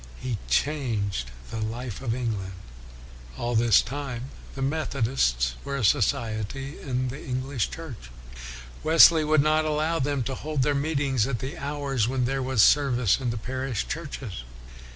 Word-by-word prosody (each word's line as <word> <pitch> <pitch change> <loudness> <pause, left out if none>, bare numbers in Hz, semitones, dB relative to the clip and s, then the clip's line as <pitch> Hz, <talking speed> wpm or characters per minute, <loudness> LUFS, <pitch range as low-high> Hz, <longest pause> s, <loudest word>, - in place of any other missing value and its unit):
He 120 -5 -3
changed 110 - 0 0.2
the 110 - -4
life 115 +1 -4
of 120 -4 -1
England. 105 -7 -3 0.8
All 120 0 -2
this 115 -3 +5
time, 135 -2 -5 0.2
the 135 - -5
Methodists 120 - 0
were 140 0 -3
a 130 - -2
society 110 +6 0
in 130 -1 -2
the 135 +4 -7
English 130 -2 -2
Church. 145 - -9 0.7
Wesley 160 0 +7
would 155 -1 +3
not 155 +1 +3
allow 155 +2 0
them 140 -2 0
to 135 - -3
hold 150 0 -2
their 145 +1 +2
meet 145 +1 0
ings 135 -5 +1
at 130 -3 -1
the 135 +7 -5
hours 140 -6 -1
when 130 0 0
there 135 +2 -1
was 130 -5 +3
service 125 -8 +4
in 130 -2 -2
the 115 - -2
parish 130 0 -3
churches. 135 - -5
130 Hz, 155 wpm, -26 LUFS, 115-145 Hz, 0.8 s, Wesley